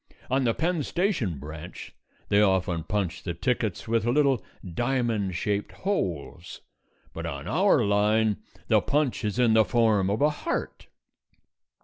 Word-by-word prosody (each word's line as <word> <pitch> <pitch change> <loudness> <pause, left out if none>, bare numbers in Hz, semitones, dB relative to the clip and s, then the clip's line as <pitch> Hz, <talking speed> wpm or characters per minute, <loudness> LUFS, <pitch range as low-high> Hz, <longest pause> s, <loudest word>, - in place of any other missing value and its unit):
On 130 0 +2
the 115 - +2
Penn 170 0 0
Station 155 - -1
branch 75 +4 -9 0.4
they 100 +1 +4
often 95 -4 +2
punch 95 -1 -2
the 85 -3 -4
tickets 115 0 -1
with 115 0 +1
little 135 +1 +2 0.2
diamond 115 -1 -1
shaped 100 +3 -2
holes; 90 - -3 0.5
but - - -5
on - - -6
our - - +3
line 105 +1 +2 0.3
the - - +4
punch 145 -5 0
is 105 +1 -2
in 120 -3 +4
the 110 0 +6
form 105 -2 +2
of 105 +2 0
a 150 - +4
heart. 150 - -4
110 Hz, 140 wpm, -26 LUFS, 95-125 Hz, 0.5 s, the